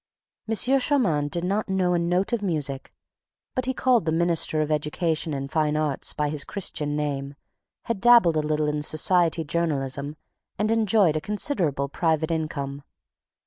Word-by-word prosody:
M. 225 - +1
Moncharmin 250 - +2
did 170 +3 -3
not 200 +3 -1
know 185 -2 +1
a 175 - +2
note 180 +6 0
of 235 - 0
music, 150 -8 -2 0.6
but 255 0 -2
he 260 - 0
called 245 -7 +2
the 160 - 0
minister 165 -1 +1
of 155 0 -1
education 155 +2 -1
and 135 -1 -4
fine 155 -1 +1
arts 150 -3 -1
by 150 -1 -2
his 145 -1 0
Christian 150 -7 -3
name, 140 -2 -3 0.5
had 230 -4 -3
dabbled 235 -9 +6
a - - +3
little 150 0 0
in 150 0 -1
society 165 +2 +2
journalism 145 -3 -2 0.4
and 215 +2 0
enjoyed 215 -7 +3
a 155 - -1
considerable 185 - -1
private 160 +2 0
income. 145 -3 -3
160 Hz, 160 wpm, -24 LUFS, 150-190 Hz, 0.6 s, dabbled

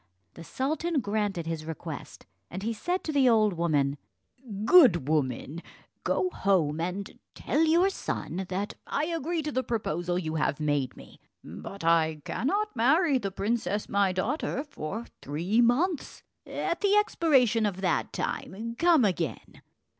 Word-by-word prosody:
The 165 - -10
sultan 310 - -1
granted 205 -6 -1
his 165 -1 -3
request, 160 -1 -7 0.2
and 185 +3 -6
he 230 +2 -1
said 355 - -2
to 315 - -3
the 275 -4 +4
old 215 -3 +4
woman, 145 -5 0 0.7
"Good 225 - +6
woman, 150 +1 -1 0.4
go 365 - 0
home, 165 - +1
and 180 +3 -4 0.2
tell 310 - 0
your 345 +5 +4
son 190 - -4
that 195 +3 -3
I 295 - 0
agree 330 0 -2
to 300 - -3
the 260 - 0
proposal 175 -8 -2
you 160 -3 -3
have 155 -2 0
made 145 -4 -1
me; - - -14 0.2
but 195 -3 -9
I 160 -2 +2
cannot 405 - -1
marry 275 +4 +3
the 200 -4 -3
princess 210 +1 -2
my 200 -1 +2
daughter 250 - -2
for 225 - -6 0.2
three 170 - 0
months; 285 +8 +1 0.2
at 340 - -2
the 405 0 +3
expiration 265 - +3
of 190 -2 -4
that 180 -3 0
time 230 +5 -4
come 335 -7 +5
again." 175 -6 -3
210 Hz, 145 wpm, -28 LUFS, -, 0.7 s, Good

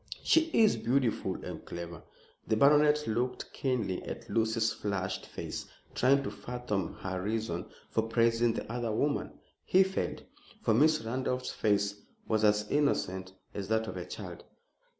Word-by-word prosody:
"She 325 0 +4
is 220 -8 +5
beautiful 125 -1 +1
and - - -6
clever." 85 -1 -7 0.5
The 110 - +2
baronet 150 +3 +5
looked 120 +3 -2
keenly 115 -9 -1
at - - -7
Lucy's 110 0 +2
flushed 95 -2 -3
face, - - -6 0.3
trying 140 +2 +4
to - - -3
fathom 120 -7 -3
her 95 -1 -3
reason 105 -4 -2 0.2
for 110 - +2
praising 115 +1 +2
the 110 - -5
other 120 -2 -1
woman. 145 +7 0 0.3
He 190 +1 +5
failed, 190 0 -3 0.4
for 110 - +3
Miss 155 +6 +4
Randolph's 125 +2 -2
face 100 -1 +1 0.3
was 110 -1 +1
as 105 0 +3
innocent 95 -10 0 0.2
as 100 -2 -4
that 110 +1 +1
of - - -6
a 90 -1 -5
child. - - -7
115 Hz, 150 wpm, -31 LUFS, 100-130 Hz, 0.5 s, is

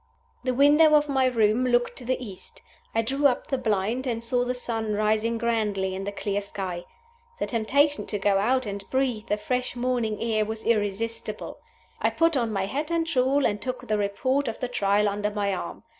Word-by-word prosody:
The 255 -1 0
window 300 +3 +6
of 295 0 +3
my 265 -2 +3
room 225 -1 +2
looked 240 -1 +2
to 250 - -7
the 255 +1 0
east. 205 -7 -9 0.3
I 225 - +3
drew 275 +5 +3
up 250 - -1
the 270 - -1
blind, 225 +3 0
and 230 -1 -2
saw 245 +1 +1
the 250 +1 -2
sun 225 -3 -2
rising 215 +2 +1
grandly 210 -5 0
in 195 +1 -5
a - - -1
clear 205 0 -2
sky. 185 -3 -5 0.5
The - - -1
temptation 280 +6 +1
to 210 - -2
go 195 0 +2
out 255 +5 +1
and 200 -1 -5
breathe 255 -5 0
the 210 - 0
fresh 250 +3 -2
morning 240 -4 -1
air 220 -2 +1
was 220 +1 -5
irresistible. 225 +1 -1 0.4
I - - +3
put 330 -1 +2
on 235 -4 0
my 195 -2 -1
hat 285 +10 -3
and 335 -1 0
shawl, 275 -2 +2
and 205 -1 0
took 255 -1 -4
the 215 - +1
Report 255 +8 0
of 225 - -4
the 250 - -2
Trial 205 -3 +2
under 205 +1 -1
my 205 -1 -1
arm. 185 - -6
230 Hz, 205 wpm, -26 LUFS, 210-255 Hz, 0.5 s, window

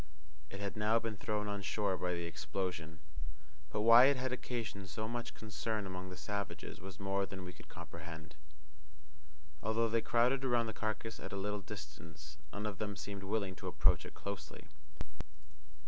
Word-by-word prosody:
It 100 - -6
had 100 -1 -2
now 105 +1 +4
been 115 -2 -1
thrown 105 +1 -1
on 100 -1 -1
shore 95 +2 +1
by 90 0 0
the 85 - -2
explosion; 80 +1 -2 0.7
but 105 +6 0
why 115 +3 +11
it 140 0 +6
had 130 0 0
occasioned 115 -6 -3
so 110 +7 -2
much 120 0 -3
concern 110 0 -2
among 95 0 -4
the 90 - -7
savages 100 -1 -3
was 95 +1 -8
more 100 0 +1
than 95 -1 -6
we 90 - -6
could - - -14
comprehend. 85 -2 -7 1.3
Although 115 +1 +3
they 115 +1 +3
crowded 120 +4 +4
around 120 -3 +4
the 110 - -2
carcass 110 +1 -2
at - - -5
a - - -1
little 105 +1 -1
distance, 75 -5 -8
none 105 - -3
of 105 -3 -2
them 105 -2 -1
seemed 100 0 -5
willing 100 -1 +1
to - - -5
approach - - +4
it - - -9
closely. 100 0 -5
100 Hz, 175 wpm, -37 LUFS, 90-110 Hz, 1.3 s, why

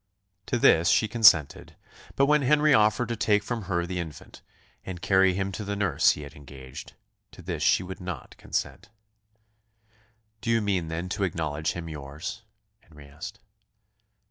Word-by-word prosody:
To - - 0
this 85 -6 +4
she 110 - +3
consented; 105 - +4 0.4
but 140 - +4
when 150 +1 +3
Henry 150 +2 +4
offered 110 +1 +3
to 115 - -1
take 105 -1 +1
from 115 -1 -4
her 85 -2 -1
the 90 0 -4
infant, 80 -3 -9 0.4
and 90 -2 -7
carry 95 0 +3
him 95 0 -2
to 105 - -6
the 100 0 -3
nurse 100 -2 +3
he 75 - -8
had 70 0 -10
engaged, 70 -3 -11 0.4
to - - -13
this - - -4
she - - +3
would 95 +1 -8
not 90 -7 -7
consent. 105 +3 -4 1.5
"Do 115 - -4
you 115 0 +3
mean, 95 -6 -1
then, 85 +3 -4
to 100 +3 -2
acknowledge 80 -4 -2
him 85 -1 -6
yours?" 75 +6 -7 0.4
Henry 75 -10 -16
asked. 70 +3 -10
95 Hz, 165 wpm, -26 LUFS, 80-110 Hz, 1.5 s, this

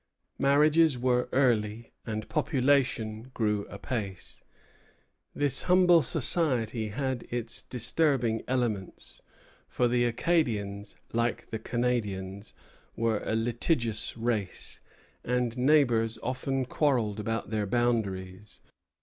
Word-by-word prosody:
Marriages 150 +1 +4
were 125 0 +1
early, 115 -4 +1 0.2
and 110 -1 -3
population 130 -6 +1
grew 105 -3 0
apace. 100 -4 -5 0.9
This 145 -2 0
humble 180 -2 +6
society 125 -6 0
had 130 +3 -2
its 120 -1 -2
disturbing 125 -2 +1
elements; 120 -7 -3 0.5
for 125 - +1
the 120 0 +2
Acadians, 110 -7 0 0.2
like 115 0 -1
the 110 - -3
Canadians, 105 -5 -2 0.4
were 115 -2 0
a 110 - -1
litigious 115 0 -1
race, 110 -5 -3 0.4
and 125 -1 0
neighbors 125 -5 +3
often 130 +1 -1
quarrelled 120 -7 +1
about 115 0 -3
their 105 -2 -1
boundaries. 100 -4 -1
120 Hz, 100 wpm, -29 LUFS, 110-130 Hz, 0.9 s, humble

